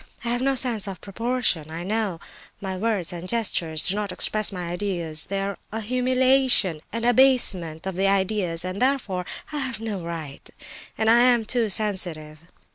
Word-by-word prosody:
I - - 0
have 245 +1 +1
no 270 +1 +1
sense 235 -5 +2
of 190 -3 -6
proportion, 210 -6 -1
I 165 +2 -6
know; 205 -3 -2 0.4
my 190 -1 -4
words 195 -4 -1
and 175 +1 -7
gestures 170 -9 +1
do - - +3
not 210 -1 -2
express 215 -1 +2
my 180 -3 -5
ideas—they 175 -1 -3
are 195 0 -4
a 220 +1 -3
humiliation 255 - +2
and 230 +1 -3
abasement 220 -11 +4
of 190 - -3
the 195 +2 +1
ideas, 190 -3 0
and 185 +3 -4
therefore, 225 -9 0 0.2
I 300 - -2
have 260 -5 -3
no 220 -3 -4
right—and 165 +6 -7
I 230 +1 +6
am 240 -2 +4
too 230 -1 +1
sensitive. 175 -7 +1
200 Hz, 165 wpm, -24 LUFS, 180-235 Hz, 0.4 s, I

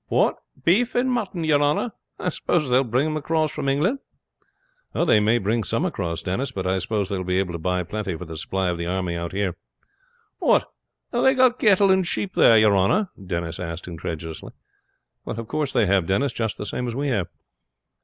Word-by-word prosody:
"What! - - +2 0.3
beef 225 +8 +3
and 255 +1 +2
mutton, 200 -8 -2
your 150 -2 +3
honor? 150 +11 +1 0.3
I 180 - -1
suppose 150 -4 -1
they 125 - +5
will 135 - +4
bring 125 +5 +1
them 155 0 -1
across 155 +1 0
from 140 -2 -2
England?" 175 - +1 1.0
"They 155 -11 +4
may 110 +3 +3
bring 110 +2 0
some 115 - 0
across, 90 - -3
Denis; 125 +9 -2
but 95 -6 -4
I 95 +1 +1
suppose 100 +1 -1
they 100 0 -2
will 95 - -3
be 90 0 0
able 95 -2 -1
to 85 - -4
buy 90 +2 0
plenty 95 -1 -4
for 90 - -7
the 80 -1 -8
supply 95 +3 -1
of 85 - -4
the 85 - -3
army 90 -1 -1
out 85 0 -4
there." 95 -3 -1 0.8
"What! - - +3 0.5
have 240 - +1
they 265 0 +4
got 255 -1 +4
cattle 200 -2 +5
and 190 -2 +2
sheep 190 +2 -2
there, 115 - +6
your 105 -2 +5
honor?" 135 - +2
Denis 85 -2 -4
asked 85 0 -5
incredulously. 80 -2 -6 0.7
"Of 115 0 -4
course 150 0 -1
they 120 -5 +3
have, 95 -3 +2
Denis; 130 +9 +1
just 110 -3 -2
the - - -5
same 125 +3 -3
as 120 - -4
we 140 +2 -1
have." 100 -9 0
110 Hz, 210 wpm, -23 LUFS, 90-155 Hz, 1.0 s, there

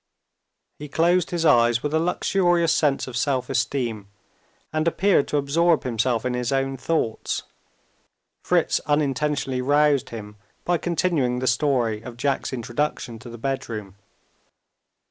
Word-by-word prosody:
He 150 0 -8
closed 170 +3 +2
his 170 -2 -1
eyes 120 -4 +4
with 150 0 -2
a 160 - +3
luxurious 175 0 +2
sense 145 -3 +1
of 130 - -8
self 130 0 0
esteem, 115 -7 -1 0.7
and 155 +1 0
appeared 185 -2 +2
to 150 - 0
absorb 160 +4 +2
himself 120 0 0
in 125 - 0
his 125 0 -2
own 135 0 0
thoughts. 130 -4 -2 1.0
Fritz - - +2
unintentionally 145 -2 0
roused 145 0 +2
him 105 -2 -9 0.3
by 175 -1 +1
continuing 165 -8 0
the 130 - -2
story 120 -4 +1
of 120 0 -10
Jack's 140 +2 -1
introduction 120 -1 -3
to 120 - -11
the 120 - -9
bedroom. 115 -6 -4
135 Hz, 135 wpm, -23 LUFS, 120-155 Hz, 1.0 s, eyes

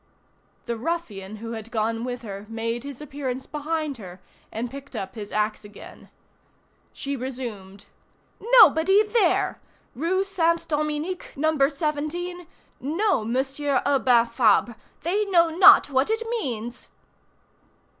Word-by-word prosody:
The 235 -1 -3
ruffian 220 - -4
who 230 +2 -7
had 220 -1 -7
gone 225 0 -1
with 245 -1 -5
her 200 -1 -8
made 230 +1 -3
his 280 -1 -8
appearance 265 -3 -5
behind 300 -1 -3
her 185 -4 -10 0.3
and 235 +2 -4
picked 280 +1 -10
up 190 0 -5
his 205 -1 -8
axe 215 0 -1
again. 205 0 -13 0.8
She 280 0 -4
resumed:— 230 -7 -7 0.6
"Nobody 400 - +6
there! 430 +1 +1 0.3
Rue 350 +8 0
Saint 335 -4 0
Dominique, 305 +3 -2
No. 315 +3 +1
17, 315 +4 -3 0.3
no 340 - 0
Monsieur 270 +4 -1
Urbain 255 -4 +4
Fabre! 235 0 +2 0.3
They 385 +6 +1
know 340 -4 +4
not 330 -3 +7
what 265 +5 +2
it 450 +1 -1
means!" 245 - -4
275 Hz, 125 wpm, -24 LUFS, 230-330 Hz, 0.8 s, not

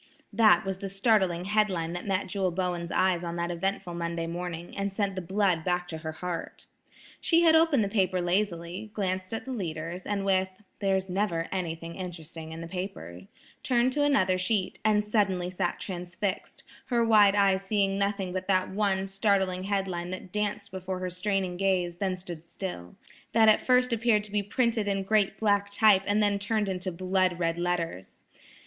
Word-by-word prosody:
That 215 -6 +5
was 190 -1 -3
the 195 - -4
startling 195 -4 +2
head 210 +1 +2
line 165 -2 -2
that 175 +3 -6
met 195 0 0
Jewel 190 0 -1
Bowen's 175 -1 -2
eyes 185 -2 +2
on 170 0 -4
that 170 0 -2
eventful 185 +1 -2
Monday 170 -1 -3
morning, 170 0 -5
and 200 0 -2
sent 195 0 -1
the 185 - -4
blood 185 -2 +1
back 180 0 0
to 160 - -5
her 160 0 -5
heart. 175 +1 -6 0.5
She 335 0 +3
had 320 -1 +6
opened 320 -7 +4
the - - 0
paper 190 -3 +1
lazily, 175 +1 -1
glanced 185 -2 -2
at 225 - -4
the 265 - -5
leaders, 170 -3 -5
and 200 -1 -1
with, 190 0 +1 0.2
"There's 190 -2 +1
never 180 -3 -1
anything 170 -3 -4
interesting 165 -3 -7
in 165 +1 -7
the 165 - -6
paper," 130 - -6 0.3
turned 250 0 +2
to 290 - +1
another 190 -11 +3
sheet, 185 0 0
and 210 -1 +3
suddenly 190 -4 +1
sat 185 - -2
transfixed, 180 +1 -4 0.2
her 235 -2 +2
wide 210 -3 +6
eyes 195 -2 +3
seeing 195 -1 0
nothing 200 -2 -1
but 185 0 -4
that 185 -1 +1
one 195 -1 +1
startling 195 -2 0
head 195 -1 0
line 175 -1 -4
that 185 0 -7
danced 210 0 -2
before 185 0 -4
her 185 0 -4
straining 185 -1 -1
gaze, 180 -3 0
then 185 -1 -1
stood 175 -3 -8
still,–that 190 - -2
at 215 - +5
first 250 -1 +3
appeared 225 -2 +2
to 210 - -9
be 205 0 +1
printed 225 0 0
in 195 -1 0
great 205 0 +2
black 205 -2 +2
type 205 -2 +5
and 210 +1 +3
then 205 -1 +2
turned 210 0 0
into 185 0 -3
blood 185 0 0
red 165 -1 -1
letters! 170 - -3
190 Hz, 185 wpm, -28 LUFS, 175-205 Hz, 0.5 s, had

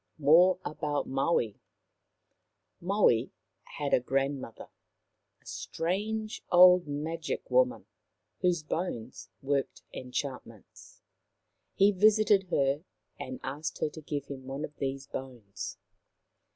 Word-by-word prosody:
MORE 170 +5 +6
ABOUT 150 -1 -2
MAUI 135 -6 0 1.2
Maui 180 - +2 0.5
had 145 -1 -2
a - - +6
grandmother, 135 -1 -2 0.7
a - - -38
strange 215 +6 -3
old 180 -1 +7
Magic 160 - -4
woman, - - +2 0.5
whose 175 -4 +1
bones 140 -8 -4
worked 140 0 -1
enchantments. 130 +1 -7 0.7
He 200 +1 +5
visited 205 0 +4
her 140 -2 +1 0.4
and 130 0 -6
asked 145 +4 -4
her - - -1
to 160 - -10
give 145 -2 -4
him 130 -2 -9
one 135 +3 -3
of 150 - -14
these 135 0 -3
bones. 125 -8 -7
150 Hz, 105 wpm, -30 LUFS, 135-180 Hz, 1.2 s, old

